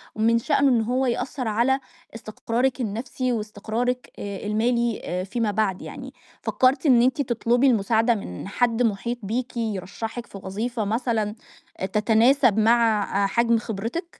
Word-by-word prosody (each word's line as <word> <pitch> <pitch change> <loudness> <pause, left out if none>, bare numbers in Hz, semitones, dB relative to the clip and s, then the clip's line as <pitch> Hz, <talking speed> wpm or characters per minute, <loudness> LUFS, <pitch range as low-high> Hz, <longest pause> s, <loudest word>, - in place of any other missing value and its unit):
ومن 230 +2 +3
شأنه 280 +1 +2
إن 240 -3 +3
هو 250 +4 0
يأثر 250 +1 -2
على 240 +5 +2 0.4
استقرارِِك 235 +4 -2
النفسي 240 +4 -2
واستقرارِِك 225 +3 -3
آآ 200 0 -6
المالي 235 +1 0
آآ 180 +1 -3
فيما 215 +3 -1
بعد 200 -3 0
يعني. - - -8 0.3
فكرتِ 260 +3 +2
إن 250 -5 +6
أنتِ 260 +4 +2
تطلبي 240 +1 +2
المساعدة 225 +1 +3
من 140 - -7
حد 240 +3 +1
محيط 235 +2 -1
بيكِ 240 +5 -3
يرشحِك 220 +2 -4
في 195 - -10
وظيفة 220 +4 -3
مثلًا 220 -1 -1 0.4
آآ - - -1
تتناسب 220 +3 +3
مع 225 -1 +3 0.2
آآ - - +3
حجم 235 +2 +2
خبرتِك؟ 230 - -4
230 Hz, 145 wpm, -24 LUFS, 210-245 Hz, 0.4 s, إن